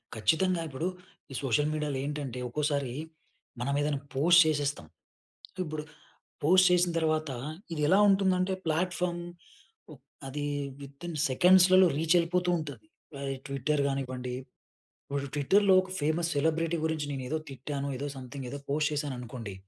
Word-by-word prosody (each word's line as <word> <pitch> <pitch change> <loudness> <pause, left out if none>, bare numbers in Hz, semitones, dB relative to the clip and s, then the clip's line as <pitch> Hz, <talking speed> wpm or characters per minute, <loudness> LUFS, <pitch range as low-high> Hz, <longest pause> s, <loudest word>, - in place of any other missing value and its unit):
ఖచ్చితంగా 165 - +2
ఇప్పుడు, 145 +6 -3 0.4
ఈ - - -6
సోషల్ 140 +4 +2
మీడియాలో 150 -3 -2
ఏంటంటే, 140 -4 -4
ఒక్కోసారి 145 -2 -1 0.7
మనం 140 +3 -1
ఏదైనా 145 -1 0 0.2
పోస్ట్ 170 +6 +6
చేసేస్తం. 145 - -1 0.8
ఇప్పుడు 155 -2 -4 0.6
పోస్ట్ 185 +4 +6
చేసిన 180 0 +3
తర్వాత, 155 -2 0 0.4
ఇది 150 - -3
ఎలా 190 +5 +5
ఉంటుందంటే 190 -1 +2
ప్లాట్ఫార్మ్ 175 +2 -1 0.7
ఆహ్, - - -12 0.3
అది 145 +2 -4 0.4
వితిన్ 140 +5 -8
సెకండ్స్‌లలో 185 +5 +6
రీచ్ 165 +2 +2
వెళ్ళిపోతూ 180 +1 +1
ఉంటది. 155 - -8 0.3
ఆహ్, 140 0 -4
ఈ - - -9
ట్విట్టర్ 140 +2 0
కానివ్వండి, 130 -2 -3 0.7
ఇప్పుడు 140 0 -3
ట్విట్టర్‌లో 190 +7 +4
ఒక 185 - -11
ఫేమస్ 160 +3 0
సెలబ్రిటీ 160 +3 +1
గురించి 160 -2 -1
నేను 130 -2 -4
ఏదో 160 - -1
తిట్టాను, 140 +2 -4
ఏదో 145 - -3
సంథింగ్ 130 0 -7
ఏదో 140 - -5
పోస్ట్ 150 +1 +1
చేశాను 145 -2 -2
అనుకోండి. 115 -4 -7
150 Hz, 135 wpm, -29 LUFS, 140-175 Hz, 0.8 s, పోస్ట్